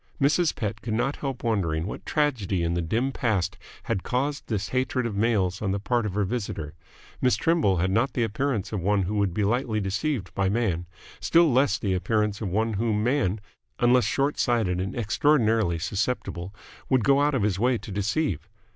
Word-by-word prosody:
Mrs. 150 Hz, +4 st, +2 dB
Pett 105 Hz, -3 st, -3 dB
could 110 Hz, -2 st, -2 dB
not 135 Hz, +5 st, 0 dB
help 135 Hz, -3 st, -4 dB
wondering 85 Hz, -9 st, 0 dB
what 105 Hz, -, -7 dB
tragedy 115 Hz, -, 0 dB
in 85 Hz, 0 st, 0 dB
the 85 Hz, -, 0 dB
dim 115 Hz, +11 st, 0 dB
past 105 Hz, -7 st, 0 dB, 0.3 s
had 115 Hz, -7 st, -1 dB
caused 140 Hz, +6 st, -2 dB
this 105 Hz, -3 st, -2 dB
hatred 130 Hz, -1 st, 0 dB
of 115 Hz, -3 st, -3 dB
males 100 Hz, -4 st, +1 dB
on 105 Hz, -, -1 dB
the 100 Hz, +1 st, 0 dB
part 115 Hz, +2 st, 0 dB
of 100 Hz, -, -5 dB
her 105 Hz, -, +2 dB
visitor. 95 Hz, -8 st, -3 dB, 0.5 s
Miss 125 Hz, -1 st, +3 dB
Trimble 160 Hz, -, +2 dB
had 95 Hz, +2 st, +1 dB
not 115 Hz, +7 st, +1 dB
the 120 Hz, -, +1 dB
appearance 115 Hz, -1 st, -1 dB
of 105 Hz, -, -1 dB
one 100 Hz, +2 st, +1 dB
who 95 Hz, +4 st, -3 dB
would 100 Hz, -4 st, 0 dB
lightly 110 Hz, +2 st, +1 dB
be -, -, -3 dB
deceived 100 Hz, -, -2 dB
by 95 Hz, -1 st, +1 dB
Man; 95 Hz, -6 st, 0 dB, 0.3 s
still 165 Hz, -2 st, +4 dB
less 135 Hz, +2 st, +3 dB
the 100 Hz, -4 st, -1 dB
appearance 105 Hz, +2 st, 0 dB
of 105 Hz, -, -2 dB
one 110 Hz, +4 st, 0 dB
whom 105 Hz, 0 st, 0 dB
Man, 120 Hz, -5 st, +1 dB, 0.4 s
unless 120 Hz, -1 st, +4 dB
short 140 Hz, +5 st, 0 dB
sighted 105 Hz, -7 st, +1 dB
and 95 Hz, -, -4 dB
extraordinarily 115 Hz, -, +2 dB
susceptible, 95 Hz, 0 st, -2 dB, 0.4 s
would 130 Hz, -4 st, +3 dB
go 140 Hz, +2 st, +4 dB
out 145 Hz, -1 st, +2 dB
of 120 Hz, -, +1 dB
his 100 Hz, -2 st, 0 dB
way 125 Hz, +2 st, +2 dB
to 110 Hz, -, -9 dB
deceive. 100 Hz, -, -1 dB
110 Hz, 195 wpm, -26 LUFS, 95-125 Hz, 0.5 s, still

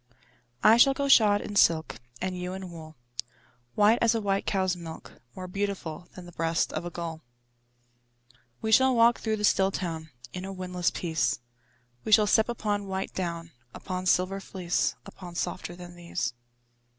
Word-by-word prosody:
I 220 Hz, +2 st, +7 dB
shall 270 Hz, +3 st, +6 dB
go 280 Hz, 0 st, -1 dB
shod 210 Hz, -6 st, +6 dB
in 205 Hz, -, -6 dB
silk, 160 Hz, -, +3 dB, 0.2 s
And 185 Hz, 0 st, -2 dB
you 180 Hz, 0 st, -4 dB
in 190 Hz, -1 st, -7 dB
wool, 160 Hz, -2 st, -10 dB, 0.8 s
White 210 Hz, +3 st, +5 dB
as 230 Hz, 0 st, +4 dB
a -, -, +1 dB
white 200 Hz, -2 st, -1 dB
cow's 190 Hz, -2 st, +1 dB
milk, 165 Hz, -2 st, -10 dB
More 185 Hz, -1 st, -6 dB
beautiful 185 Hz, -4 st, -4 dB
Than 185 Hz, -, -9 dB
the 175 Hz, -, -11 dB
breast 165 Hz, 0 st, 0 dB
of -, -, -3 dB
a -, -, -3 dB
gull. 165 Hz, -2 st, -6 dB, 1.4 s
We 220 Hz, -, 0 dB
shall 260 Hz, +3 st, +5 dB
walk 235 Hz, 0 st, +5 dB
through 220 Hz, -1 st, -1 dB
the 210 Hz, -, -5 dB
still 195 Hz, -2 st, +4 dB
town 165 Hz, -4 st, -4 dB, 0.2 s
In 180 Hz, -, -5 dB
a 195 Hz, -, -5 dB
windless 180 Hz, -2 st, -1 dB
peace; 160 Hz, -10 st, -1 dB, 0.7 s
We 220 Hz, -, -4 dB
shall 215 Hz, 0 st, +7 dB
step 220 Hz, +2 st, +3 dB
upon 205 Hz, -3 st, -2 dB
white 190 Hz, 0 st, -3 dB
down, 170 Hz, -2 st, -4 dB, 0.2 s
Upon 185 Hz, 0 st, -4 dB
silver 185 Hz, +2 st, +2 dB
fleece, 180 Hz, -3 st, -1 dB
Upon 180 Hz, -3 st, -10 dB
softer 175 Hz, 0 st, -3 dB
than 175 Hz, 0 st, -10 dB
these. 170 Hz, -7 st, -3 dB
185 Hz, 170 wpm, -28 LUFS, 175-205 Hz, 1.4 s, I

